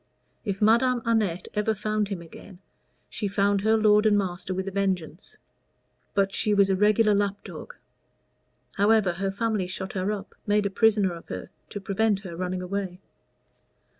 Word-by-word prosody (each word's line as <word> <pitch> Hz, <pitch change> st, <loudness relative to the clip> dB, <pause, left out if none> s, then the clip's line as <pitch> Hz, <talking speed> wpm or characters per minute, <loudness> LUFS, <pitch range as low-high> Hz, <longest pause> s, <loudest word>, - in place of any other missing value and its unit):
If 200 Hz, -1 st, -2 dB
Madame 235 Hz, +2 st, +3 dB
Annette 210 Hz, -7 st, 0 dB
ever 215 Hz, +1 st, 0 dB
found 215 Hz, 0 st, -1 dB
him 190 Hz, -4 st, -5 dB
again, 175 Hz, +3 st, -13 dB, 0.5 s
she 210 Hz, -, -3 dB
found 200 Hz, 0 st, +1 dB
her 220 Hz, +2 st, +3 dB
lord 210 Hz, 0 st, +4 dB
and 205 Hz, -1 st, +4 dB
master 185 Hz, -1 st, -3 dB
with 190 Hz, +1 st, -3 dB
a -, -, -3 dB
vengeance; 190 Hz, -3 st, -3 dB, 0.8 s
but 195 Hz, 0 st, +2 dB
she 210 Hz, -2 st, +1 dB
was 200 Hz, -1 st, +4 dB
a -, -, +3 dB
regular 210 Hz, +2 st, +4 dB
lapdog. 200 Hz, 0 st, -3 dB, 1.0 s
However, 205 Hz, -2 st, +4 dB
her 195 Hz, +3 st, -2 dB
family 205 Hz, -1 st, -1 dB
shut 190 Hz, +1 st, -6 dB
her 190 Hz, +1 st, -1 dB
up 205 Hz, -1 st, -6 dB
made 205 Hz, 0 st, +2 dB
a 200 Hz, -, -1 dB
prisoner 205 Hz, -3 st, +3 dB
of 170 Hz, -, -11 dB
her 95 Hz, 0 st, -6 dB, 0.2 s
to 205 Hz, -, -5 dB
prevent 200 Hz, +1 st, 0 dB
her 180 Hz, -4 st, -8 dB
running 180 Hz, +1 st, -3 dB
away." 185 Hz, -1 st, -4 dB
200 Hz, 165 wpm, -26 LUFS, 190-215 Hz, 1.0 s, lord